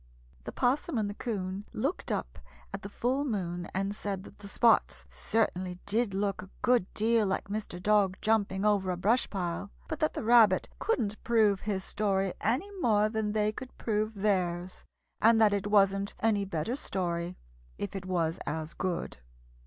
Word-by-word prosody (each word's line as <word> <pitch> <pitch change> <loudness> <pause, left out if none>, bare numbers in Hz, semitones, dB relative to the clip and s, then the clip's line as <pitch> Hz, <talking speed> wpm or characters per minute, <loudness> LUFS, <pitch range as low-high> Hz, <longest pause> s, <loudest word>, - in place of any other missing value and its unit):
The - - -5
'Possum 265 +3 0
and 215 -2 +1
the 205 - -4
'Coon 200 -3 -4
looked 275 +11 -2
up - - -3 0.3
at 195 - -4
the 200 - -7
full 255 +6 0
moon 180 -8 -3
and 195 +1 -1
said 200 -2 -4
that - - -14
the 205 - -9
spots 230 +3 +3
certainly 185 -5 -1
did 210 -1 +1
look 195 -1 -1
a 190 - -11
good 245 -6 +3
deal 225 0 +3
like 190 +1 -2
Mr. 205 -4 -4
Dog 195 -1 +3
jumping 205 -3 +1
over 200 -3 +2
a 180 - -1
brush 220 +8 +2
pile, 175 -4 -3 0.2
but - - -4
that - - 0
the - - -3
Rabbit 220 -4 +5
couldn't 220 - -1
prove 215 -5 +3
his 200 -3 -2
story 195 -3 0
any 265 - 0
more 215 -7 +3
than 220 -1 -1
they 210 0 +2
could 255 +4 -9
prove 215 0 -1
theirs, 185 -3 -1 0.4
and 225 0 +6
that 215 -2 +5
it 200 0 -1
wasn't 200 -1 +3
any 210 -3 +2
better 190 +6 -2
story, 175 - -3 0.4
if 100 - -5
it 185 -1 -5
was 170 -3 0
as 160 +2 -3
good. 185 -2 -3
205 Hz, 175 wpm, -30 LUFS, 185-220 Hz, 0.4 s, and